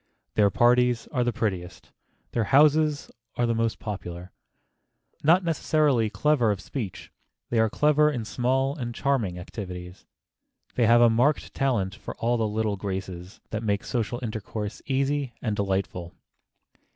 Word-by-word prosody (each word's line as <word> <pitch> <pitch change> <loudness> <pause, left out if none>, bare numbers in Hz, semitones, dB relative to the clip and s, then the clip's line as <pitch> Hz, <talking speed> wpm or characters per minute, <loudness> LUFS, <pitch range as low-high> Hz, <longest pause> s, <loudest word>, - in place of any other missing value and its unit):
Their 105 -1 +4
parties 120 +2 +3
are 125 -3 +1
the 120 - +1
prettiest; 95 -7 -4 0.4
their 115 -2 0
houses 150 +3 +3 0.2
are 120 - +1
the 115 - +1
most 115 0 0
popular. 90 -4 -6 0.9
Not 170 +5 +5
necessarily 150 -7 +2
clever 140 -1 +2
of 100 -3 0
speech, 110 -7 -6 0.4
they 115 - +2
are 110 0 +3
clever 150 +4 +3
in 120 -7 -3
small 130 +4 0
and 120 -5 -5
charming 120 -11 0
activities. 90 -1 -8 0.7
They 120 -3 +2
have 120 +1 +6
a 120 - +7
marked 125 +6 +1
talent 115 -9 0
for 110 - -8
all 120 +1 0
the 110 -1 0
little 105 -1 -1
graces 95 -1 -6
that 110 - -2
make 105 -2 -1
social 120 -1 -2
intercourse 110 -1 -5
easy 140 -1 0
and 110 -3 -2
delightful. 95 -3 -2
115 Hz, 145 wpm, -26 LUFS, 100-135 Hz, 0.9 s, a